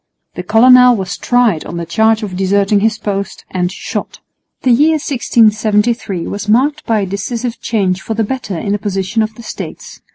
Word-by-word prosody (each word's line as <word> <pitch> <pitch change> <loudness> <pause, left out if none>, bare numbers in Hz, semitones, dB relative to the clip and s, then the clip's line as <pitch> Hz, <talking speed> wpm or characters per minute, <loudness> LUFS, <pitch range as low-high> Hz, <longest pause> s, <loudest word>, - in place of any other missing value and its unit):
The - - -5
colonel 250 +1 +6
was 190 -4 -4
tried 240 -10 +1
on 170 - -7
the 170 - -4
charge 220 +6 +1
of 195 -3 -5
deserting 200 +2 +2
his 220 +1 +1
post, 200 -2 -4
and 180 -1 -1
shot. - - -6 0.4
The 255 - +3
year 295 +7 +4
1673 220 - +1
was 205 +1 -5
marked 265 +6 +2
by 220 -2 +1
a - - -1
decisive 230 +5 -4
change 195 -5 -1
for 220 - -4
the 225 - 0
better 215 -5 -4
in 200 +3 -3
the 205 - 0
position 200 +2 -2
of 220 0 -2
the 235 - -12
States. - - -8
215 Hz, 185 wpm, -15 LUFS, 195-235 Hz, 0.4 s, colonel